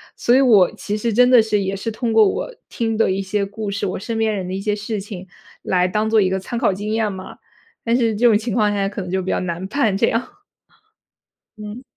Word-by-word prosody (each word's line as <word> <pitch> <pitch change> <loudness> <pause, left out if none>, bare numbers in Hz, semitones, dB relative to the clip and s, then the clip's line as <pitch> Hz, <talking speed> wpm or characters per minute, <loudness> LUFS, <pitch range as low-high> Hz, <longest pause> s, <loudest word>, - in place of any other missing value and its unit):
所 240 - +2
以 265 - +5
我 215 -9 +5
其 210 0 -4
实 230 +1 -1
真 250 +3 +5
的 250 -1 +7
是 215 -2 0
也 195 0 -2
是 195 +4 -4
通 230 +1 -2
过 220 -2 +5
我 - - -3 0.2
听 225 -2 -2
的 225 - +2
一 190 +1 -1
些 200 +1 -1
故 205 +1 -6
事， 200 +1 -3
我 185 - -3
身 225 +3 -4
边 220 -1 +1
人 190 -2 -4
的 185 - -5
一 - - -3
些 205 +1 -1
事 210 +1 -4
情， 190 -2 -8 0.3
来 180 -1 +1
当 210 +4 -1
做 220 0 +4
一 190 -3 +3
个 190 - 0
参 215 +5 -5
考 230 -5 +2
经 205 +3 -5
验 220 -2 0
嘛， 185 0 -9 0.5
但 230 0 +1
是 230 -3 +1
这 240 +4 +3
种 225 - +5
情 215 0 -1
况 210 -3 +2
下 200 -1 0
可 200 -1 -5
能 180 - -7
就 190 0 0
比 185 - -5
较 - - 0
难 175 0 -4
判 220 -3 0
这 230 +4 +2
样。 230 +2 -1 1.3
嗯。 210 +4 -8
210 Hz, 275 characters per minute, -20 LUFS, 195-225 Hz, 1.3 s, 的